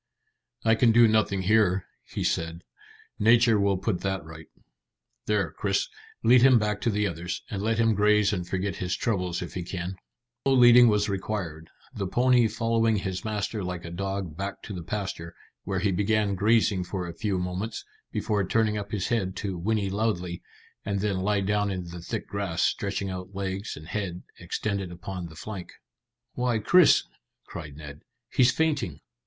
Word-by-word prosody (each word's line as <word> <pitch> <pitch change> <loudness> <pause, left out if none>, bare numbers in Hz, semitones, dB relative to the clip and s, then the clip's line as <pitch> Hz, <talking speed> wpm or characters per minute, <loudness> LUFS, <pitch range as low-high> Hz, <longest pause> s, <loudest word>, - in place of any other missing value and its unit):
"I 110 - +5
can 115 +1 +4
do 120 +1 +7
nothing 105 -3 +2
here," 95 -2 +3 0.2
he - - -4
said. 85 +1 -1 0.6
"Nature 115 0 +5
will 100 -1 +2
put 95 -1 -2
that 95 -5 -2
right. 80 0 -11 0.8
There, 100 -7 +1
Chris, - - -1 0.3
lead 120 +2 +6
him 130 -1 +7
back 105 -2 -1
to - - +1
the 105 -1 +1
others, 85 -2 -4
and 100 - -3
let 110 +2 0
him 115 -1 +3
graze 105 0 +3
and 90 -3 -3
forget 95 0 -2
his 90 0 -2
troubles 90 -7 -1
if 85 - -8
he 90 - -3
can." 90 +1 -5 0.5
No 135 - +3
leading 120 -1 +8
was 105 -1 +2
required, 95 -5 -4 0.2
the 100 -5 -3
pony 125 +3 +4
following 115 0 +1
his 95 -2 -3
master 105 -1 -2
like 90 -1 -5
a 85 - -7
dog 95 -2 -3
back 100 +3 -5
to 105 - -7
the 90 - -5
pasture, 85 -3 -5 0.3
where 95 0 -2
he 100 -1 +2
began 105 +2 +1
grazing 105 -1 +2
for 90 0 -4
a 85 - -6
few 100 +1 -1
moments, 90 +5 -4 0.3
before 105 -2 0
turning 105 +2 +1
up 100 0 -7
his 100 -3 -2
head 100 -6 0
to 100 -4 -3
whinny 100 +2 -1
loudly, 95 -5 -1 0.4
and 100 -1 -2
then 100 -2 0
lie 100 +2 +1
down 105 +1 +1
in 95 -2 -3
the 85 0 -8
thick - - -4
grass, 100 -5 -2
stretching 100 -1 -1
out 90 +1 -7
legs 95 +2 -4
and 80 +1 -11
head, 90 -4 -4 0.2
extended 100 -4 -3
upon 90 0 -6
the 80 - -13
flank. 95 +1 -7 0.6
"Why, 125 -2 0
Chris," 175 - +5 0.4
cried 75 -4 -8
Ned, 75 -2 -10 0.3
"he's 125 0 +5
fainting!" 140 - -1
100 Hz, 175 wpm, -27 LUFS, 90-110 Hz, 0.8 s, leading